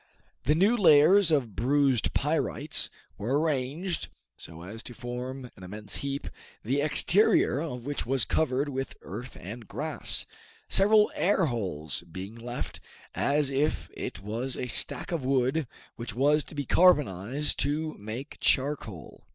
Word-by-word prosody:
Then 150 +4 +3
new 200 +7 +4
layers 175 0 +6
of 130 - +1
bruised 130 +1 +2
pyrites 150 0 +1 0.3
were 130 +8 +1
arranged 155 +3 -1 0.3
so 80 0 -10
as 105 +5 -7
to 120 - -9
form 125 +1 -6
an - - -15
immense 105 +3 -6
heap, 140 0 -3 0.4
the 135 +6 +1
exterior 160 +1 +3
of 125 -7 -5
which 145 0 -2
was 130 0 +1
covered 140 -2 +1
with 135 -1 -4
earth 125 +1 -7
and 110 +5 -8
grass, - - -2 0.4
several 210 +2 +4
air 190 -1 +2
holes 90 - -3
being 95 +5 -6
left, 120 +1 -6 0.3
as 145 -1 +1
if 145 +3 0
it - - -5
was 120 +5 -3
a - - -2
stack 120 +7 -3
of 165 -5 -1
wood 130 +2 +1 0.3
which 115 -3 -6
was 145 +4 +3
to - - -11
be 145 -1 -2
carbonized 145 - +3
to 155 +3 0
make 110 +7 -7
charcoal. 130 - -1
135 Hz, 145 wpm, -28 LUFS, 120-150 Hz, 0.4 s, layers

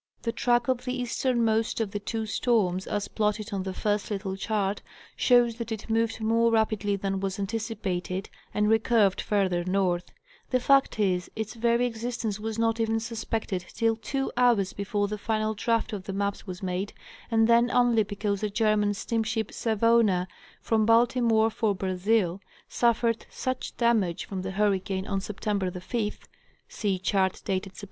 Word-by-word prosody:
'The 230 - 0
track 240 0 +1
of 255 -1 0
the 255 0 -3
easternmost 235 -3 +1
of 220 -3 -1
the 205 - -3
two 220 +2 -3
storms, 205 -5 +1
as 205 -1 -2
plotted 210 0 -1
on 195 - -1
the 190 0 -3
first 210 +3 -1
little 195 -2 -3
chart, 200 0 -1 0.3
shows 240 -2 +4
that 235 -1 -5
it 220 +1 -5
moved 225 0 +1
more 230 +1 +3
rapidly 215 -2 +1
than 195 0 -2
was 195 -1 -2
antici 220 +2 -3
pated, 185 0 -3 0.2
and 210 0 +1
recurved 220 -2 +3
farther 190 -4 +1
north: 185 -1 0 0.4
the 255 - +2
fact 275 -2 +3
is, 180 -4 +1
its 220 -1 -4
very 235 +1 +2
exist 240 0 -4
ence 210 -2 -2
was 220 +1 -4
not 225 0 +1
even 225 0 +1
suspected 220 -4 -3
till 225 -1 +2
two 270 +4 -3
hours 235 -6 +3
before 205 0 -1
the 210 +1 -4
final 215 0 0
draft 230 +2 0
of 195 -3 -5
the 195 - -4
maps 200 +1 -2
was 180 0 -7
made, 185 +2 -2 0.4
and 225 -1 +3
then 235 +1 +5
only 240 -2 +4
because 205 -1 -2
the 210 - 0
German 210 -1 +2
steam 230 +3 -1
ship 220 -1 -2
"Savona," 220 -4 +2 0.3
from 220 -1 +1
Baltimore 230 0 +4
for 215 -2 0
Brazil, 190 0 0 0.3
suffered 235 -1 +1
such 255 -1 -4
damage 220 -8 +1
from 190 -2 -5
the 185 - -4
hurricane 195 -1 0
on 195 -1 -1
Sept. 200 +1 -8 0.2
5th 210 +5 -3 0.4
(see 200 -3 -1
chart 190 0 0
dated 190 0 -2
Sept. - - -12
215 Hz, 170 wpm, -27 LUFS, 195-230 Hz, 0.4 s, then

